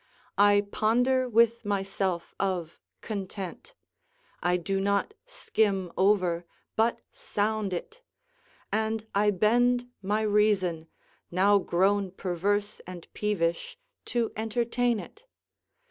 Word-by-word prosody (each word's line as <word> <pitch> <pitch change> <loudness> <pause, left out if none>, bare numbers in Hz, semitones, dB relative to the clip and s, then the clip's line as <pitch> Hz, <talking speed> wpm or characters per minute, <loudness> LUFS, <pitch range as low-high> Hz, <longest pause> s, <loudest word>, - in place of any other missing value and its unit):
I 205 0 +5
ponder 245 +4 +2
with 235 0 +3
myself 195 -3 -2
of 180 -4 -2 0.2
content; 200 - -6 0.7
I 180 0 +2
do 195 +3 -2
not 200 - 0
skim 200 - 0
over, 185 -3 +2 0.3
but 225 +2 +1
sound 215 - -1
it; 440 - -6 0.7
and 220 0 -1
I 210 +1 +3
bend 245 +5 +2
my 210 +3 0
reason, 205 -6 +2 0.4
now 200 +3 +4
grown 195 +2 +1
perverse 200 +3 -1
and 180 -2 -9
peevish, 180 - -1 0.3
to 235 -2 -1
entertain 235 +1 0
it. - - -12
205 Hz, 100 wpm, -28 LUFS, 190-225 Hz, 0.7 s, I